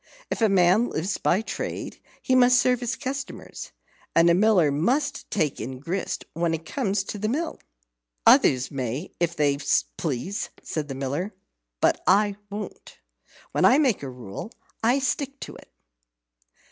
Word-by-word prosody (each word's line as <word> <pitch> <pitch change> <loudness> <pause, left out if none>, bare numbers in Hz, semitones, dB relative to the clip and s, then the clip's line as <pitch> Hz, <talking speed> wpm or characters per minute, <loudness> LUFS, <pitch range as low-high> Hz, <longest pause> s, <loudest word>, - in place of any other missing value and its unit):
If - - -2
a 220 - +5
man 190 +4 +4
lives 180 +6 -2
by 190 +5 +2
trade, - - -5 0.2
he 260 - +1
must 250 -1 +6
serve 250 0 +2
his 245 0 -2
customers. 275 -1 -6 0.4
And 170 +1 +6
a - - +5
Miller 185 -5 +4
must 250 - 0
take 155 -8 -1
in 130 0 -5
grist 175 +7 -3
when 165 0 0
it 165 0 -9
comes 195 +4 -1
to 205 - -6
the 215 +2 -1
mill." 315 +7 -2 0.7
"Others 130 0 +5
may 135 +4 -4
if 170 -1 0
they 145 -2 +2 0.4
please," 165 +6 -3
said 155 -2 -3
the 135 - -5
Miller; 140 +10 -3 0.5
"but - - +3
I 200 +1 +4
won't. 205 +1 -8 0.5
When - - 0
I 255 - +7
make 270 -9 +2
a 140 - -5
rule, 125 - -8 0.3
I 240 +4 +3
stick 275 0 -2
to - - -7
it." - - -15
195 Hz, 160 wpm, -25 LUFS, 150-240 Hz, 0.7 s, I